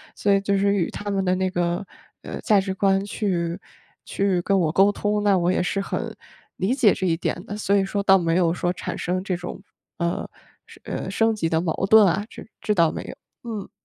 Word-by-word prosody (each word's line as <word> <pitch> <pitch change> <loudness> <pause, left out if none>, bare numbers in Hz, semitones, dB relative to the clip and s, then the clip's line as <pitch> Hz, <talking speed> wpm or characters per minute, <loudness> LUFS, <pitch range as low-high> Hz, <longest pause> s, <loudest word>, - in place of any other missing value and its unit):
所 205 - +1
以 195 - +3
就 200 0 +1
是 200 +1 +2
与 185 -4 0
他 205 0 -6
们 195 -1 0
的 180 0 +1
那 185 0 0
个， 175 +1 -1 0.4
呃， - - -6
价 210 -4 +4
值 190 0 -2
观 195 0 +2
去 175 -5 -2 0.5
去 195 -3 0
跟 195 +2 +1
我 160 -3 +1
沟 195 +2 +5
通， 205 0 -1
那 200 -2 +4
我 175 0 +1
也 - - +1
是 195 +2 -1
很 195 - -3 0.4
理 195 +8 0
解 235 -8 +5
这 190 - -2
一 165 - +2
点 165 - -3
的， 205 - -6
所 205 -1 -1
以 195 - +2
说 200 +1 -2
倒 195 -1 +6
没 165 -2 0
有 175 -2 +3
说 175 0 -1
产 - - -5
生 185 +2 -2
这 185 -3 -2
种， 175 +1 -7 0.4
呃， 170 0 -2 0.4
升 - - -17
呃， - - -5
升 225 0 +2
级 205 -6 -1
的 160 0 +1
矛 175 +2 -1
盾 220 -2 +8
啊， 195 +3 +1
这 - - -11
这 210 - 0
倒 165 -3 +4
没 - - -5
有。 - - -9 0.3
嗯。 210 -3 -5
195 Hz, 245 characters per minute, -23 LUFS, 175-200 Hz, 0.5 s, 盾